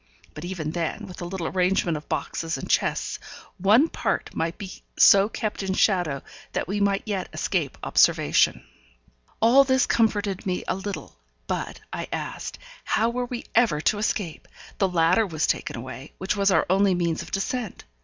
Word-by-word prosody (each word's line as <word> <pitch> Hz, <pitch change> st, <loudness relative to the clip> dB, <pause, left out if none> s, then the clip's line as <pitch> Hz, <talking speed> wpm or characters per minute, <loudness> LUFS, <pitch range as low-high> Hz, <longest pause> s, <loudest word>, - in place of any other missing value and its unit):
But 150 Hz, -, -8 dB
even 175 Hz, -4 st, -4 dB
then, 170 Hz, +5 st, -3 dB
with 185 Hz, -2 st, -10 dB
a -, -, -3 dB
little 175 Hz, -1 st, -4 dB
arrangement 180 Hz, -1 st, +1 dB
of 150 Hz, 0 st, -8 dB
boxes 165 Hz, 0 st, -2 dB
and -, -, -6 dB
chests, -, -, 0 dB, 0.4 s
one 215 Hz, -, +5 dB
part -, -, -2 dB
might 165 Hz, +1 st, -2 dB
be 190 Hz, -2 st, -8 dB, 0.2 s
so 200 Hz, +1 st, +7 dB
kept 215 Hz, -2 st, -3 dB
in 190 Hz, -1 st, -1 dB
shadow 175 Hz, -11 st, +2 dB, 0.3 s
that -, -, -1 dB
we 200 Hz, +3 st, -1 dB
might 200 Hz, -1 st, +1 dB
yet 200 Hz, -4 st, -3 dB
escape 165 Hz, -8 st, -1 dB
observation. -, -, +3 dB, 0.8 s
All 250 Hz, +5 st, +7 dB
this 260 Hz, -1 st, +3 dB
comforted 205 Hz, -4 st, +1 dB
me 180 Hz, -1 st, -2 dB
a -, -, +1 dB
little; 195 Hz, +1 st, -6 dB, 0.3 s
but, -, -, -4 dB
I -, -, -4 dB
asked, -, -, -5 dB, 0.3 s
how 225 Hz, +2 st, +1 dB
were 250 Hz, +1 st, -2 dB
we 245 Hz, -1 st, -6 dB
ever 225 Hz, -10 st, +3 dB
to 205 Hz, +6 st, +1 dB
escape? 205 Hz, -6 st, -2 dB, 0.3 s
The 195 Hz, -, +3 dB
ladder 180 Hz, +5 st, +3 dB
was 160 Hz, -3 st, 0 dB
taken -, -, -1 dB
away, 130 Hz, +4 st, -8 dB
which 190 Hz, +2 st, -1 dB
was 200 Hz, -1 st, +3 dB
our 190 Hz, -, +3 dB
only 190 Hz, +1 st, +3 dB
means 170 Hz, -2 st, 0 dB
of -, -, -9 dB
descent. 215 Hz, +2 st, -3 dB
190 Hz, 175 wpm, -25 LUFS, 170-210 Hz, 0.8 s, so